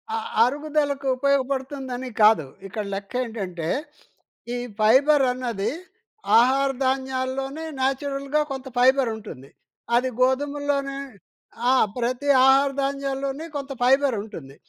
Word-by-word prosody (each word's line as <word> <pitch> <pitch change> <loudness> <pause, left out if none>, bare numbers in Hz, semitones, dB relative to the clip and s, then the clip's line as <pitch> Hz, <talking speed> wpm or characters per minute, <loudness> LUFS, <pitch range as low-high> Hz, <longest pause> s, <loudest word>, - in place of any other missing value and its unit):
ఆహ్, 450 0 -4
అరుగుదలకు 285 +1 -1
ఉపయోగపడుతుందని 265 -1 -1
కాదు. 210 -8 +5 0.2
ఇక్కడ 210 +2 -5
లెక్క 200 0 -7
ఏంటంటే, 190 -8 -5 0.9
ఈ - - -2 0.2
ఫైబరన్నది 250 -2 +3 0.7
ఆహార 270 +3 +3 0.2
ధాన్యాల్లోనే 265 +3 -2
నేచురల్‌గా 275 +2 -1
కొంత 265 0 -5
ఫైబరుంటుంది. 225 - +1 0.5
అది 255 +2 +2
గోధుమల్లోనే 280 +1 0 0.7
ఆ! - - +5 0.2
ప్రతి 250 +4 -1 0.2
ఆహార 275 +1 +5
ధాన్యాల్లోనీ 275 +1 -3
కొంత 280 -1 -5
ఫైబరుంటుంది. 220 - 0
265 Hz, 90 wpm, -24 LUFS, 245-280 Hz, 0.9 s, కాదు